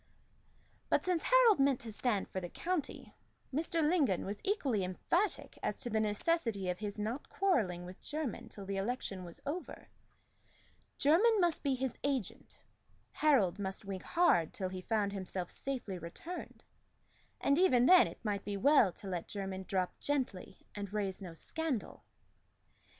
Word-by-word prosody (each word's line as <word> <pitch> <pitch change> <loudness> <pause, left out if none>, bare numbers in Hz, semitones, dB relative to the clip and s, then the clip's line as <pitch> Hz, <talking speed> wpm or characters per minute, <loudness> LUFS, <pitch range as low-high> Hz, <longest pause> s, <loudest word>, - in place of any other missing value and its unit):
But - - +2
since 360 -3 +1
Harold - - +5
meant 275 -2 +3
to 230 - -7
stand 215 -2 0
for 185 - -4
the 175 - -5
county, 345 - -3 0.4
Mr. 320 +1 +1
Lingon 295 - +2
was 200 +1 -4
equally 275 - +1
emphatic 335 - -1
as - - -2
to 240 -3 -4
the 220 - +2
necessity 215 - 0
of 180 - -2
his 210 -1 -4
not 220 +7 -3
quarrelling 210 - +1
with 180 +2 -10
Jermyn 300 -4 -4
till 200 - -8
the 195 0 -3
election 195 -3 -3
was 170 -1 -8
over. 330 +6 -5 1.1
Jermyn 405 +10 +5
must 345 -3 +2
be 275 -2 +1
his 260 -1 -2
agent; 270 -8 -3 0.5
Harold 210 - +3
must 195 +1 -4
wink 195 -2 -4
hard 255 - +3
till 185 -1 -3
he 185 0 -6
found 205 0 0
himself 185 -2 -4
safely 245 -9 -3
returned; 250 - -8 0.8
and 280 +3 +3
even 255 -10 +5
then 365 +4 +8
it - - -11
might 205 -2 -1
be 205 -1 -3
well 260 -3 +5
to 200 - -11
let 180 -3 -3
Jermyn 190 -2 -5
drop 185 -2 -1
gently 260 -10 -3
and 200 -2 -5
raise 200 -3 -2
no 175 -4 -8
scandal. 310 - -3
220 Hz, 155 wpm, -34 LUFS, 190-300 Hz, 1.1 s, then